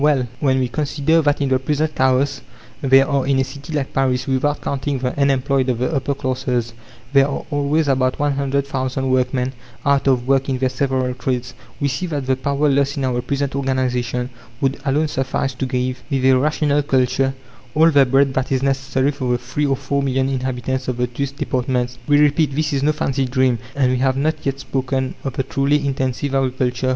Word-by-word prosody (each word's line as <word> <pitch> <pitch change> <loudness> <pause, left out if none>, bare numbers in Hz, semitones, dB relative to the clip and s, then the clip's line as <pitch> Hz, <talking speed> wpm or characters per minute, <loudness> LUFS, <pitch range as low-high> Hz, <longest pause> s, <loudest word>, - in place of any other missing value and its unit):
Well, 145 -4 +3
when 130 -2 +2
we 130 -1 +1
consider 150 +5 +1
that 145 -1 +1
in 140 - +1
the 130 -1 +2
present 150 +3 -1
chaos 130 +1 +1 0.4
there 135 0 +5
are, 140 -3 0
in 140 -1 +2
a 135 - +3
city 140 +3 -9
like 145 -3 -2
Paris, 130 -1 +1
without 135 +2 0
counting 140 0 -2
the 125 -1 -2
unemployed 135 -1 +1
of 125 - +1
the 125 +6 -1
upper 140 0 -1
classes, 125 -3 -2 0.4
there 135 0 +5
are 140 - -4
always 145 +2 +1
about 130 -1 +1
100,000 135 -2 -1
workmen 125 0 0 0.3
out 140 -1 +2
of 125 -2 +2
work 135 0 +2
in 130 - 0
their 130 0 +1
several 130 -1 -1
trades, 125 -1 -3 0.3
we 140 - +1
see 140 +7 -2
that 145 -5 -3
the 130 0 +2
power 140 +2 0
lost 140 0 +1
in 135 - 0
our 125 -1 0
present 140 +1 -2
organization 125 -2 -1 0.3
would 135 0 -1
alone 145 +3 +2
suffice 135 -1 -2
to 130 +1 -3
give, 125 0 -2
with 135 -3 0
a 130 0 +6
rational 145 +1 +2
culture, 135 -1 +1 0.4
all 160 +2 +5
the 140 -2 +6
bread 135 +1 +3
that 130 0 -1
is 130 0 +1
necessary 135 0 +1
for 130 -4 -2
the - - +2
three 130 +5 -2
or 135 - +2
four 140 +1 -1
million 135 -1 0
inhabitants 130 0 -2
of 125 -2 -2
the 125 - +1
two 125 +3 -3
departments. 125 -2 -2
We 145 0 +4
repeat, 150 -1 +3
this 155 0 0
is 135 - 0
no 150 +2 +3
fancy 135 -3 -1
dream, 130 -2 +1 0.2
and 130 -3 +2
we 130 - 0
have 130 0 +1
not 155 +3 -1
yet 135 0 -1
spoken 130 0 -2
of 135 - -3
the 135 - -1
truly 140 +2 +1
intensive 135 0 -1
agriculture. 130 -1 0
135 Hz, 205 wpm, -20 LUFS, 130-140 Hz, 0.4 s, a